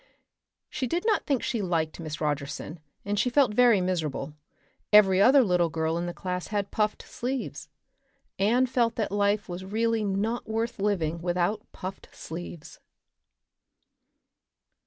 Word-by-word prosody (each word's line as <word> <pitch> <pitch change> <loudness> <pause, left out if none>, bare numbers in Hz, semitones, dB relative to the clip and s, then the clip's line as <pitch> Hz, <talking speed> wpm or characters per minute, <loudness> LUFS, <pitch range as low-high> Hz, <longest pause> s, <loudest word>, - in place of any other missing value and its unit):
She 265 -4 -3
did 345 - -2
not 435 -2 +1
think 275 -4 +1
she 235 -4 -1
liked 165 -4 -1
Miss 155 -2 -5
Rogerson, 150 +2 -3 0.3
and 205 0 -1
she 250 - +2
felt 250 -3 +3
very 240 -2 +5
miserable; 155 -6 -2 0.6
every 195 -3 +6
other 265 +5 +7
little 180 -5 +2
girl 160 0 -1
in 170 +1 -2
the - - -2
class 180 +2 -4
had 205 -2 -2
puffed 210 -1 0
sleeves. 255 +1 -5 0.7
Anne 235 +6 +3
felt 240 -2 +1
that 215 -4 -2
life 205 0 +1
was 180 0 -6
really 225 +3 0
not 210 +4 -1
worth 225 +1 -2
living 170 -5 0
without 180 +4 -1
puffed 185 +1 -7
sleeves. 170 0 -8
200 Hz, 140 wpm, -27 LUFS, 175-230 Hz, 0.7 s, other